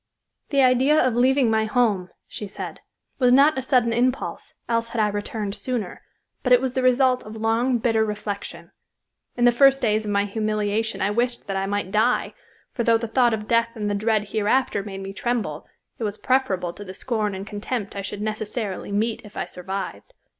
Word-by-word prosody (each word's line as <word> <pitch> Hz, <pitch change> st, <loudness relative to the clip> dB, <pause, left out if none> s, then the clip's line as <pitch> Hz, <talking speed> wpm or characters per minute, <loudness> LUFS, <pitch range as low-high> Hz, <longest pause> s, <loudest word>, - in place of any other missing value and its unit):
"The 280 Hz, -2 st, +3 dB
idea 260 Hz, +4 st, +4 dB
of 255 Hz, -, +1 dB
leaving 255 Hz, 0 st, +3 dB
my 220 Hz, 0 st, +2 dB
home," 215 Hz, -5 st, +1 dB, 0.2 s
said 210 Hz, -1 st, -7 dB
she, -, -, -42 dB
"was 250 Hz, -2 st, +4 dB
not 280 Hz, +4 st, +6 dB
a 265 Hz, -, -1 dB
sudden 250 Hz, -3 st, +2 dB
impulse, 250 Hz, +2 st, -1 dB
else 230 Hz, 0 st, 0 dB
had 230 Hz, -, -4 dB
I 210 Hz, -1 st, +3 dB
returned 205 Hz, 0 st, -4 dB
sooner, 235 Hz, -5 st, -4 dB, 0.4 s
but 255 Hz, -, -1 dB
it 250 Hz, -, +8 dB
was 260 Hz, -1 st, -2 dB
the 260 Hz, -, 0 dB
result 255 Hz, 0 st, +3 dB
of 215 Hz, +1 st, -9 dB
long, 225 Hz, +3 st, +1 dB
bitter 225 Hz, -1 st, +2 dB
reflection. 210 Hz, -1 st, -5 dB, 0.7 s
In 240 Hz, -, +3 dB
the 245 Hz, -, +7 dB
first 270 Hz, +2 st, +5 dB
days 220 Hz, -4 st, +1 dB
of -, -, -3 dB
my 200 Hz, 0 st, +2 dB
humiliation 215 Hz, 0 st, -1 dB
I 200 Hz, -, +1 dB
wished 240 Hz, +2 st, -1 dB
that 195 Hz, -, -4 dB
I 195 Hz, 0 st, -1 dB
might 205 Hz, -1 st, -2 dB
die, 220 Hz, +4 st, +1 dB, 0.4 s
for 235 Hz, -, -1 dB
though 230 Hz, 0 st, +4 dB
the 230 Hz, -, -4 dB
thought 240 Hz, 0 st, +3 dB
of 215 Hz, -1 st, -8 dB
death 230 Hz, 0 st, +3 dB
and 210 Hz, -2 st, -2 dB
the -, -, 0 dB
dread 215 Hz, 0 st, 0 dB
hereafter 215 Hz, +1 st, +1 dB
made 195 Hz, -1 st, -7 dB
me 195 Hz, 0 st, -6 dB
tremble, 215 Hz, -10 st, -2 dB, 0.3 s
it -, -, -3 dB
was 210 Hz, -1 st, -2 dB
preferable 195 Hz, -10 st, 0 dB
to 205 Hz, -, -9 dB
the 185 Hz, -1 st, -9 dB
scorn 215 Hz, -3 st, -2 dB
and 190 Hz, +1 st, -6 dB
contempt 205 Hz, 0 st, -4 dB
I 200 Hz, -, -3 dB
should 200 Hz, +1 st, -5 dB
necessarily 215 Hz, -2 st, -3 dB
meet 220 Hz, +3 st, 0 dB
if 210 Hz, -, -13 dB
I -, -, -1 dB
survived. 180 Hz, -, -6 dB
220 Hz, 200 wpm, -23 LUFS, 205-245 Hz, 0.7 s, it